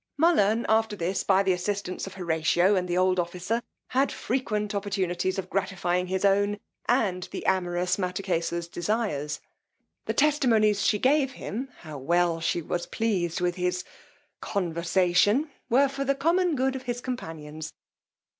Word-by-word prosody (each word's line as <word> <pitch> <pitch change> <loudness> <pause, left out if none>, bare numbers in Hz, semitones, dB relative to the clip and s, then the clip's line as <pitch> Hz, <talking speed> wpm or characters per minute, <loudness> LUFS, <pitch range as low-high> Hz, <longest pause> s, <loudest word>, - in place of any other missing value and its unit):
Mullern, 235 - +4
after 220 -1 +2
this, 185 +1 -1
by 195 0 +4
the 190 - +2
assistance 190 0 -3
of 195 - -9
Horatio 175 +2 +2
and 180 -1 0
the 175 0 -1
old 185 0 +3
officer, 180 +7 -1 0.3
had 265 +2 +2
frequent 215 -5 -2
opportunities 190 -2 -1
of 195 - -3
gratifying 180 -2 -1
his 190 +2 0
own 200 +1 +3 0.3
and 195 -8 +1
the - - -6
amorous 180 -1 +1
Mattakesa's 180 -3 -2
desires. 170 -6 -2 0.6
The - - -2
testimonies 230 -9 +3
she 210 0 +3
gave 270 +3 +2
him 255 +2 -5
how 155 -4 -8
well 170 +3 +2
she 170 +1 0
was 175 +2 -3
pleased 185 -7 -1
with 175 0 0
his 180 0 -1 0.6
conversation, 185 - +1 0.2
were 270 +4 +5
for 275 0 -3
the 275 0 +1
common 335 +4 +2
good 265 0 +1
of 265 - -4
his 240 0 -1
companions. 160 - -6
190 Hz, 145 wpm, -27 LUFS, 175-225 Hz, 0.6 s, were